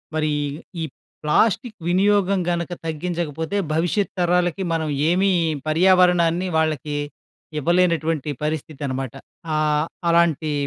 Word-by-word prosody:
మరి 155 -1 +1 0.5
ఈ - - -1 0.4
ప్లాస్టిక్ 220 - +2
వినియోగం 195 +1 +3
గనక 170 0 -2
తగ్గించకపోతే 165 +1 -3 0.2
భవిష్యత్తు 175 +5 0
తరాలకి 180 +1 +1
మనం 160 -1 -1 0.2
ఏమీ 190 +3 +3 0.4
పర్యావరణాన్ని 180 +1 +4
వాళ్ళకి 155 -2 0 0.6
ఇవ్వలేనటువంటి 165 -2 +1
పరిస్థితనమాట. 140 -4 -3 0.4
ఆహ్, 150 0 +2 0.2
అలాంటి 165 -2 +2
170 Hz, 90 wpm, -22 LUFS, 155-180 Hz, 0.6 s, పర్యావరణాన్ని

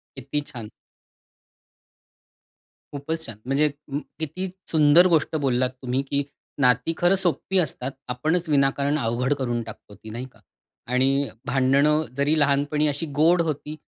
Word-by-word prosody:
किती 140 +2 -3
छान! 115 -4 -8 2.2
खूपच 160 +3 -4
छान. 115 -3 -8
म्हणजे 140 +3 +2 0.2
उम्म, 140 +1 -3 0.2
किती 170 +5 -4 0.2
सुंदर 155 +3 +6
गोष्ट 155 0 +1
बोललात 130 -1 +1
तुम्ही 130 +1 -1
की 140 0 +1 0.4
नाती 125 +5 +3
खरं 175 +2 +3
सोप्पी 190 +1 +1
असतात, 135 -5 -2 0.2
आपणच 155 +7 -1
विनाकारण 140 +1 +2
अवघड 120 +4 0
करून 120 -3 -2
टाकतो 105 -2 -12
ती 110 +2 -12
नाही 120 +4 -6
का? - - -23 0.5
आणि 135 +2 +1 0.2
भांडणं 140 +4 +3
जरी 145 +3 +2
लहानपणी 145 +1 +2
अशी 145 +3 -2 0.2
गोड 170 +2 +5
होती 150 +1 -5
140 Hz, 135 wpm, -24 LUFS, 130-155 Hz, 2.2 s, सुंदर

